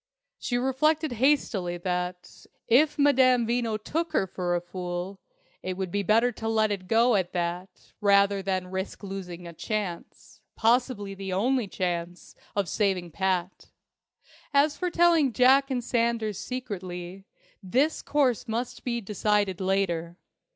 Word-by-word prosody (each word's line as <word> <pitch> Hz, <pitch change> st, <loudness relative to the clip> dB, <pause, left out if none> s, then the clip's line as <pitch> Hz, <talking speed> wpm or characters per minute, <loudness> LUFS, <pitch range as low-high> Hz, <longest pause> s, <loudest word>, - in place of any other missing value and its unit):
She 245 Hz, -, -1 dB
reflected 300 Hz, +4 st, +1 dB
hastily 230 Hz, -8 st, +1 dB
that, 180 Hz, 0 st, -4 dB, 0.2 s
if 290 Hz, +6 st, +4 dB
Madame 260 Hz, -4 st, +4 dB
Veno 230 Hz, -2 st, 0 dB
took 325 Hz, +10 st, -3 dB
her -, -, +2 dB
for 180 Hz, -1 st, -2 dB
a -, -, +1 dB
fool, 180 Hz, +2 st, -5 dB, 0.4 s
it 185 Hz, 0 st, -4 dB
would 190 Hz, -2 st, -3 dB
be 205 Hz, -, 0 dB
better 225 Hz, +4 st, +3 dB
to 225 Hz, -1 st, -6 dB
let 220 Hz, -1 st, +2 dB
it 190 Hz, -2 st, -4 dB
go 230 Hz, +4 st, +4 dB
at 190 Hz, -4 st, 0 dB
that 180 Hz, +1 st, -4 dB
rather 200 Hz, -1 st, +4 dB
than 185 Hz, -1 st, -2 dB
risk 190 Hz, +2 st, -5 dB
losing 180 Hz, -3 st, -7 dB
a 170 Hz, -, -8 dB
chance 195 Hz, -1 st, -5 dB
possibly 230 Hz, -3 st, +1 dB
the 195 Hz, -1 st, -6 dB
only 235 Hz, +5 st, +1 dB
chance 175 Hz, -2 st, -4 dB, 0.2 s
of 200 Hz, -3 st, 0 dB
saving 185 Hz, -2 st, 0 dB
Pat. 185 Hz, +1 st, -2 dB, 0.9 s
As 290 Hz, +1 st, +4 dB
for 360 Hz, -, -2 dB
telling 335 Hz, -6 st, +3 dB
Jack 265 Hz, +4 st, +5 dB
and 250 Hz, -2 st, -1 dB
Sanders 230 Hz, -4 st, 0 dB
secretly, 190 Hz, -6 st, -6 dB, 0.4 s
this 260 Hz, -, +1 dB
course 260 Hz, -5 st, +1 dB
must 235 Hz, +2 st, -4 dB
be 235 Hz, -1 st, -2 dB
decided 205 Hz, -2 st, 0 dB
later. 175 Hz, -3 st, -1 dB
200 Hz, 140 wpm, -27 LUFS, 185-245 Hz, 0.9 s, Jack